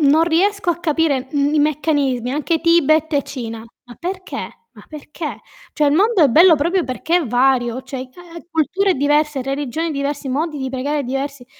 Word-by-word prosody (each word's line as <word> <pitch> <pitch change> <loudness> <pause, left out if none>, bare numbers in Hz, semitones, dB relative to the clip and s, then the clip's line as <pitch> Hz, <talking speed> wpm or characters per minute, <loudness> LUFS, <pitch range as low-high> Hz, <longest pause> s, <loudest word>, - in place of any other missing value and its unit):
non 305 +3 +4
riesco 375 +3 +1
a 335 - -1
capire, 295 -5 0
mhmm, 285 +1 0
i - - +3
meccanismi. 280 -4 0
Anche 310 +3 -1
Tibet 320 -2 +3
e 285 - +2
Cina. 230 -5 -7 0.2
Ma 245 - -13
perché? 370 +1 -5 0.4
Ma - - -15
perché? 305 +1 -7 0.3
Cioè 300 - +1
il 285 - +3
mondo 405 +2 +3
è 285 - +6
bello 325 +5 +6
proprio 345 +5 +1
perché 320 +7 -1
è 335 -7 0
vario, 245 0 +1
cioè 265 - -7
ehm, 340 -1 -12
culture 370 +5 +1
diverse, 295 0 +1
religioni 280 +4 -3
diverse, 280 0 -3
modi 300 +3 -2
di 265 -1 -3
pregare 280 +2 -2
diversi. 270 0 -4
295 Hz, 175 wpm, -19 LUFS, 270-330 Hz, 0.4 s, è